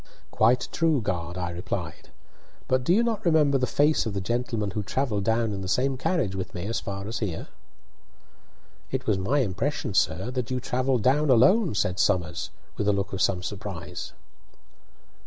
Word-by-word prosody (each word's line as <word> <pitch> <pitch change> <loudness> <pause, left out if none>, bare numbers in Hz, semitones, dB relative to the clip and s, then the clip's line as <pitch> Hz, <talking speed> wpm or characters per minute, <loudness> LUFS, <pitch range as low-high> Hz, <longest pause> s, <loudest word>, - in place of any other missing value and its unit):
"Quite 120 +3 +3
true, 165 -4 +2
guard," 85 -5 -3
I 90 -1 -2
replied; 85 +1 -5 0.6
"but 130 0 +1
do 145 - +1
you 215 +6 +5
not 225 -2 -1
remember 150 -5 +4
the 125 - +1
face 150 -3 +2
of 105 - -4
the - - 0
gentleman 115 0 -2
who 105 - -2
travelled 105 -2 -1
down 115 -1 +1
in 95 - -4
the 95 - -5
same 130 +7 +1
carriage 130 - 0
with 95 -1 -5
me 90 +1 -4
as 115 0 -1
far 100 0 -5
as 110 - -3
here?" 95 -7 -4 1.4
"It - - -3
was 100 -3 +1
my 130 +10 +1
impression, 120 - -2
sir, 95 +6 +1
that 125 -2 -3
you 130 0 -1
travelled 125 -1 0
down 145 +4 +3
alone," 145 - +5
said 90 -2 0
Somers, 85 -4 +1 0.3
with 105 - -1
a 105 - +4
look 100 0 -2
of 95 - -2
some 90 -2 +1
surprise. 90 -4 -6
110 Hz, 180 wpm, -26 LUFS, 95-135 Hz, 1.4 s, you